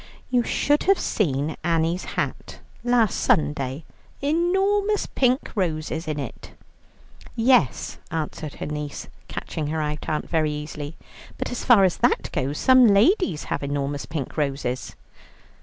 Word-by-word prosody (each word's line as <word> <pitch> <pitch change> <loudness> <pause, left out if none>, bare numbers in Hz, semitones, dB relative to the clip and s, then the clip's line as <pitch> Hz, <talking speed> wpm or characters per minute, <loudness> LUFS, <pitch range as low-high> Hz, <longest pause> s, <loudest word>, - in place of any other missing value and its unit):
"You 250 -1 +4
should 290 +5 +1
have 390 0 +5
seen 150 -5 0
Annie's 165 +1 +1
hat - - -3 0.2
last 240 -4 +3
Sunday: 145 -1 +1 0.3
enormous 385 +7 +1
pink 255 +1 +1
roses 160 -4 -2
in 150 -1 -2
it." 135 -6 -8 0.8
"Yes," 230 - +2
answered 155 -2 -4
her - - -5
niece, 150 -1 -5 0.2
catching 155 -2 -4
her 160 +1 -2
aunt 150 -1 -3
out 155 -1 -2
very 155 -2 +1
easily, 150 0 -6 0.4
"but - - -3
as 245 - -4
far 235 -6 +6
as 185 -3 +2
that - - +1
goes 140 +1 -2
some 255 -2 +6
ladies 205 - +3
have - - -3
enormous 140 0 -3
pink 155 -2 -5
roses." 135 -4 -2
160 Hz, 135 wpm, -24 LUFS, 150-245 Hz, 0.8 s, far